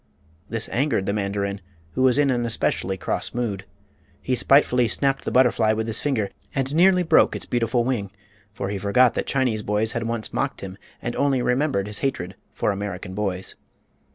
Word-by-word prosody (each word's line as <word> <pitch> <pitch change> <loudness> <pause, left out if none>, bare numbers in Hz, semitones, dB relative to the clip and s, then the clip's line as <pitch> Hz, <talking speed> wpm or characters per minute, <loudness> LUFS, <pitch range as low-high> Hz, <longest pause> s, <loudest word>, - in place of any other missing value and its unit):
This 115 0 -2
angered 125 -7 +1
the 100 - -1
mandarin, 100 -1 -2 0.3
who 130 - -2
was 130 0 +4
in 145 -2 +3
an 120 -1 0
especially 95 -4 -1
cross - - -2
mood. 105 -6 -2 0.5
He 130 - -2
spitefully 125 -2 +4
snapped 135 +5 0
the - - 0
butterfly 125 -4 +4
with 110 0 -2
his 110 -1 -1
finger, 115 -9 -1 0.2
and 135 +1 -1
nearly 180 +2 +5
broke 160 -1 +4
its - - -4
beautiful 120 0 0
wing; 115 -6 -1 0.4
for 100 -1 -4
he 100 -1 -3
forgot 115 +5 +4
that - - -3
Chinese 125 -6 +1
boys 105 +2 0
had 115 -1 -3
once 115 -2 -3
mocked - - -2
him 95 +1 -8 0.2
and 120 - -3
only 135 -3 +1
remembered 125 -5 +1
his 105 0 -5
hatred 95 -10 -2 0.2
for - - 0
American 100 -1 -5
boys. 95 -2 -3
115 Hz, 180 wpm, -23 LUFS, 100-130 Hz, 0.5 s, nearly